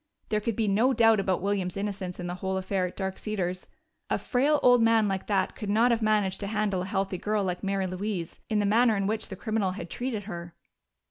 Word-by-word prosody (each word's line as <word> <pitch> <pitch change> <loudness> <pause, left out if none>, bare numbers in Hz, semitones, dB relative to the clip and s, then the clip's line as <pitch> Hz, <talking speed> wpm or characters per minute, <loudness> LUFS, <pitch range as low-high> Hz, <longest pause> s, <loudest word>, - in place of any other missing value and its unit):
There 215 0 +1
could 225 0 -2
be 220 -1 0
no 225 +7 +3
doubt 225 -2 +5
about 190 -2 0
William's 195 -2 -1
innocence 195 -3 -4
in 180 - -4
the 175 - -3
whole 190 +1 -2
affair 190 -1 -1
at 180 - -11
Dark 190 -1 -3
Cedars: 185 -4 -3 0.4
a - - +1
frail 285 +3 +2
old 245 -1 +6
man 225 -1 +4
like 195 -1 -2
that 195 -3 0
could 210 - -5
not 230 +4 +4
have 230 -1 +1
managed 210 -3 +1
to 200 - -4
handle 205 -3 0
a - - -3
healthy 195 -1 -2
girl 210 -1 0
like 180 -1 -2
Mary 195 -1 0
Louise 185 -2 -4
in 215 - +1
the 205 - +2
manner 220 +1 +4
in 195 - 0
which 220 +2 -1
the 190 - -6
criminal 210 -2 -1
had 175 -3 -7
treated 240 -4 -3
her. 170 -4 -7
200 Hz, 230 wpm, -27 LUFS, 190-220 Hz, 0.4 s, old